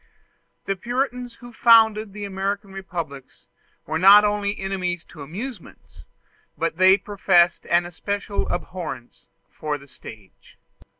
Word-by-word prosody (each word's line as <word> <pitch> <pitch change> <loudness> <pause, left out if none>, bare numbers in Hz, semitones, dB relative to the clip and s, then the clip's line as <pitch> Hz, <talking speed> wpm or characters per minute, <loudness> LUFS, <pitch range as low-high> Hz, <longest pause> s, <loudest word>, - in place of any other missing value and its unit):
The 195 - -1
Puritans 245 +2 -3
who 240 0 -13
founded 220 -3 +5
the 205 +1 -6
American 195 +1 -4
republics 170 -8 -7 0.4
were 160 +2 -2
not 200 +3 +8
only 205 0 -1
enemies 185 -3 -3
to 155 - -12
amusements, 195 - -9 0.5
but 165 0 -2
they 190 +1 +6
professed 190 -3 +2
an 175 0 +2
especial 200 +4 -4
abhorrence 175 -9 -6 0.2
for 150 -1 -4
the 140 0 -16
stage. 105 -7 -15
195 Hz, 120 wpm, -23 LUFS, 170-210 Hz, 0.5 s, not